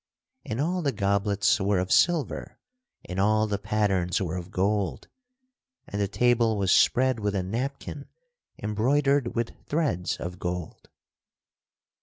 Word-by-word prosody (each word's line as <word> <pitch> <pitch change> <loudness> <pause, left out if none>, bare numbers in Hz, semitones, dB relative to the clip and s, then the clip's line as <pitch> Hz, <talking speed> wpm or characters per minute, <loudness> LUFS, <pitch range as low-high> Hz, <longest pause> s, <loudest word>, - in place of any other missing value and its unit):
And 110 - -4
all 175 +5 0
the 145 -4 +1
goblets 100 -1 +1
were 100 0 +1
of 90 +1 -1
silver 170 -4 +1 0.5
and 90 +1 -5
all 110 +2 +3
the 105 -2 -2
pattens 100 -4 0
were 90 -3 -2
of 90 0 -6
gold, 95 -6 -1 0.8
and 100 - -3
the 100 - +1
table 115 +1 +2
was 95 -2 +1
spread 130 -1 +4
with 105 -1 -1
a 95 - 0
napkin 135 +7 -4 0.5
embroidered 130 +5 +1
with 115 0 -1 0.2
threads 145 - -1
of 90 +1 -6
gold. 90 -2 -5
105 Hz, 135 wpm, -26 LUFS, 95-125 Hz, 0.8 s, spread